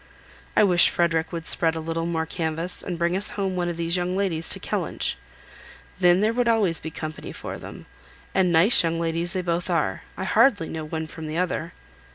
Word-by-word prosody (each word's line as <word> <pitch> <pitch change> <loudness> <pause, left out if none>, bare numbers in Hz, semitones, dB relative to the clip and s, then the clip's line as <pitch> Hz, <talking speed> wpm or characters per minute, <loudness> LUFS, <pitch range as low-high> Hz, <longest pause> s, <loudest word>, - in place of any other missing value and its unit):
I - - +7
wish 180 -4 +5
Frederick 165 -1 0
would 165 -2 -5
spread 165 0 +2
a - - -3
little 165 +1 -3
more 165 -1 -1
canvass, 165 +1 -2
and 175 - -4
bring 170 +1 +1
us 195 +2 -1
home 190 -2 -1
one 175 -1 -1
of 170 - -4
these 170 +1 -1
young 180 +1 -1
ladies 165 -5 0
to - - +1
Kellynch. - - -2 0.8
Then 180 +1 +5
there 220 +2 +2
would 245 0 +1
always 205 -8 +3
be 160 - -6
company 155 0 -7
for - - -7
them. - - -10 0.5
And 185 -2 +3
very 165 +1 +5
nice 230 - +6
young 165 0 -1
ladies 170 +1 -1
they 185 - -2
both 170 0 -1
are; - - 0 0.2
I - - -3
hardly 205 -12 +3
know 160 -1 -5
one 160 +1 -4
from 160 0 -8
the 155 +1 -4
other." 175 -1 -2
170 Hz, 210 wpm, -24 LUFS, 160-180 Hz, 0.8 s, I